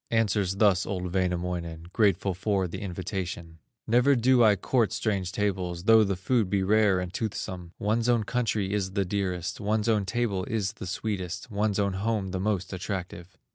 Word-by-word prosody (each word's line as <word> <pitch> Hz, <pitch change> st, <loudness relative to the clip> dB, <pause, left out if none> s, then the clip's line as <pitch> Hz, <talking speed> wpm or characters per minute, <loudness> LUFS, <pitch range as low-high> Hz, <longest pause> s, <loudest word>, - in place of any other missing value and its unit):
Answers 105 Hz, -4 st, +1 dB
thus 100 Hz, -2 st, +3 dB
old 90 Hz, -2 st, -3 dB
Wainamoinen, 90 Hz, -2 st, -2 dB
Grateful 100 Hz, -3 st, +2 dB
for 95 Hz, 0 st, 0 dB
the 85 Hz, -, -6 dB
invitation: 90 Hz, -3 st, -5 dB, 0.3 s
"Never 125 Hz, +5 st, +4 dB
do 125 Hz, 0 st, +4 dB
I 105 Hz, -2 st, +6 dB
court 115 Hz, +3 st, +1 dB
strange 100 Hz, -5 st, -1 dB
tables, 95 Hz, -4 st, -2 dB
Though 110 Hz, +1 st, +6 dB
the 100 Hz, -2 st, 0 dB
food 105 Hz, +2 st, 0 dB
be 100 Hz, -1 st, +1 dB
rare 105 Hz, -1 st, +3 dB
and 90 Hz, 0 st, -5 dB
toothsome; 95 Hz, -5 st, -4 dB
One's 115 Hz, +3 st, 0 dB
own 120 Hz, -2 st, +3 dB
country 110 Hz, -4 st, -1 dB
is 95 Hz, -2 st, -1 dB
the 100 Hz, -1 st, 0 dB
dearest, 90 Hz, -1 st, -2 dB
One's 105 Hz, +1 st, 0 dB
own 105 Hz, -4 st, +2 dB
table 115 Hz, -6 st, -1 dB
is 110 Hz, -2 st, -2 dB
the 95 Hz, -, -8 dB
sweetest, 95 Hz, 0 st, -4 dB
One's 105 Hz, 0 st, 0 dB
own 100 Hz, -2 st, +1 dB
home, 100 Hz, -1 st, -1 dB
the 95 Hz, -, -2 dB
most 95 Hz, -2 st, -1 dB
attractive. 95 Hz, -1 st, -6 dB
100 Hz, 175 wpm, -27 LUFS, 90-110 Hz, 0.3 s, I